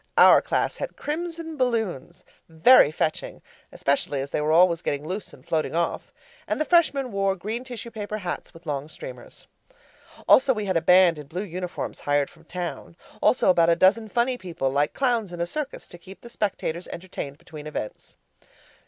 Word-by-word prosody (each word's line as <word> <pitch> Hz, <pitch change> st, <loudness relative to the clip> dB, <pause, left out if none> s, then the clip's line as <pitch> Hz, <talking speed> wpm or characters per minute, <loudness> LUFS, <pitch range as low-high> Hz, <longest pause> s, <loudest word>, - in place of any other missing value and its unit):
Our -, -, +8 dB
class -, -, -1 dB
had -, -, -5 dB
crimson 325 Hz, +1 st, -4 dB
balloons 225 Hz, -, -2 dB, 0.2 s
very 160 Hz, -, +6 dB
fetching, 155 Hz, 0 st, -3 dB, 0.3 s
especially 140 Hz, 0 st, -1 dB
as 135 Hz, +1 st, -5 dB
they -, -, -1 dB
were 150 Hz, +1 st, +1 dB
always 170 Hz, 0 st, +5 dB
getting 145 Hz, +1 st, -2 dB
loose 190 Hz, +3 st, -5 dB
and 130 Hz, -, -17 dB
floating 160 Hz, -3 st, -1 dB
off 170 Hz, 0 st, -2 dB, 0.4 s
and -, -, -1 dB
the 310 Hz, -, +1 dB
Freshmen 290 Hz, -7 st, +2 dB
wore 195 Hz, -1 st, +1 dB
green 215 Hz, +6 st, -4 dB
tissue 240 Hz, -2 st, -8 dB
paper 215 Hz, -1 st, -5 dB
hats 180 Hz, -4 st, -5 dB
with 165 Hz, -, -16 dB
long 145 Hz, 0 st, -3 dB
streamers. -, -, -10 dB, 0.8 s
Also 265 Hz, -1 st, +6 dB
we 210 Hz, -1 st, -3 dB
had 190 Hz, -2 st, -1 dB
a 165 Hz, -, +3 dB
band 180 Hz, -1 st, +5 dB
in 150 Hz, -, -10 dB
blue 180 Hz, +6 st, -4 dB
uniforms 180 Hz, -1 st, -5 dB
hired 145 Hz, -1 st, 0 dB
from 165 Hz, -1 st, -21 dB
town. 175 Hz, -1 st, -6 dB, 0.3 s
Also 250 Hz, -, +4 dB
about 170 Hz, -2 st, +4 dB
a 170 Hz, -, +5 dB
dozen 205 Hz, +5 st, +3 dB
funny 245 Hz, +3 st, 0 dB
people, 165 Hz, -7 st, -3 dB
like 145 Hz, +2 st, 0 dB
clowns 240 Hz, -7 st, 0 dB
in 175 Hz, -, -7 dB
a 170 Hz, -, +1 dB
circus, 295 Hz, -, -5 dB
to 175 Hz, -, -12 dB
keep 190 Hz, +2 st, -13 dB
the 235 Hz, -, -11 dB
spectators 190 Hz, -6 st, -3 dB
entertained 160 Hz, -6 st, -7 dB
between 155 Hz, -2 st, -10 dB
events. 130 Hz, -8 st, -7 dB
180 Hz, 180 wpm, -25 LUFS, 160-235 Hz, 0.8 s, Our